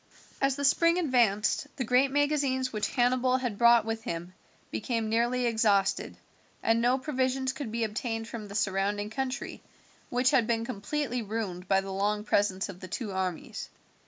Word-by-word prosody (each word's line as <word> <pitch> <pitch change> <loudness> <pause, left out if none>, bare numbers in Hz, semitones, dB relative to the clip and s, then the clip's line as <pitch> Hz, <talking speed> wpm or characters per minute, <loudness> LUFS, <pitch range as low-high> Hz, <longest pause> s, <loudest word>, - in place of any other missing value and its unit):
As 275 -1 +2
the 285 0 -1
spring 335 +4 +4
advanced 245 - +2
the 265 - -2
great 250 +3 +3
magazines 280 -3 +1
which 210 -1 0
Hannibal 255 0 +3
had 245 -6 -3
brought 235 -1 +6
with 225 0 -3
him 175 -2 -5 0.4
became 230 -4 -2
nearly 240 +2 +1
exhausted, 210 -4 +1 0.5
and 225 +1 +3
no 245 +2 +3
provisions 260 -1 -1
could 265 -4 -6
be 230 0 -1
obtained 225 +1 -3
from 230 -2 -7
the 200 - -9
surrounding 205 +1 0
country, 265 +2 -4 0.5
which 250 +1 +2
had 250 -6 +3
been 230 -1 0
completely 250 +3 -2
ruined 200 -4 -4
by 195 0 +3
the 195 0 -6
long 210 +2 0
presence 200 -2 +1
of 195 -3 -9
the 185 - -8
two 210 +3 -4
armies. 185 -3 -4
230 Hz, 165 wpm, -29 LUFS, 205-260 Hz, 0.5 s, brought